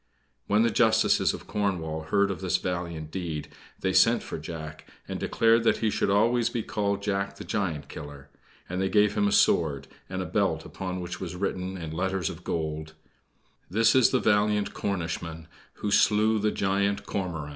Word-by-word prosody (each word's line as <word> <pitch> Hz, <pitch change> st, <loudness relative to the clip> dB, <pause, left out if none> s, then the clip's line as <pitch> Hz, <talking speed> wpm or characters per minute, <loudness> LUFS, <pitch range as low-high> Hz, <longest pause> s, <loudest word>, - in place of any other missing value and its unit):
When 105 Hz, +2 st, +3 dB
the 115 Hz, -, +2 dB
Justices -, -, +3 dB
of -, -, -8 dB
Cornwall 80 Hz, -6 st, -2 dB
heard 100 Hz, +1 st, +3 dB
of 95 Hz, -, -6 dB
this 95 Hz, -1 st, +1 dB
valiant 85 Hz, -4 st, -4 dB
deed, 80 Hz, -5 st, -4 dB, 0.3 s
they 95 Hz, -1 st, 0 dB
sent 115 Hz, +6 st, +5 dB
for -, -, -6 dB
Jack, 80 Hz, -1 st, -8 dB, 0.2 s
and -, -, -4 dB
declared 115 Hz, 0 st, +3 dB
that -, -, +3 dB
he 110 Hz, -1 st, 0 dB
should -, -, 0 dB
always 115 Hz, +4 st, +3 dB
be 120 Hz, -2 st, -3 dB
called 100 Hz, -1 st, -1 dB
Jack 100 Hz, -1 st, -1 dB
the -, -, -8 dB
Giant 85 Hz, -8 st, -2 dB
Killer; 70 Hz, -1 st, -9 dB, 0.4 s
and 90 Hz, +1 st, -3 dB
they 95 Hz, -, +1 dB
gave 105 Hz, 0 st, +4 dB
him 105 Hz, 0 st, +2 dB
a -, -, +1 dB
sword, 70 Hz, -8 st, +3 dB, 0.2 s
and 95 Hz, 0 st, -4 dB
a 95 Hz, -, -2 dB
belt 85 Hz, -3 st, 0 dB
upon 90 Hz, +3 st, -5 dB
which 90 Hz, 0 st, -6 dB
was 90 Hz, -2 st, -5 dB
written, 95 Hz, 0 st, -3 dB
in 80 Hz, -3 st, -6 dB
letters 95 Hz, +1 st, -1 dB
of -, -, -11 dB
gold: 80 Hz, -1 st, -3 dB, 0.8 s
"This 115 Hz, +4 st, +4 dB
is 130 Hz, -2 st, +5 dB
the -, -, +2 dB
valiant 105 Hz, -1 st, +2 dB
Cornishman 80 Hz, -4 st, -4 dB, 0.3 s
Who 105 Hz, -, -4 dB
slew 110 Hz, +2 st, +4 dB
the 105 Hz, +1 st, +2 dB
giant 100 Hz, +1 st, 0 dB
Cormoran." 85 Hz, -7 st, -3 dB
95 Hz, 180 wpm, -27 LUFS, 80-105 Hz, 0.8 s, sent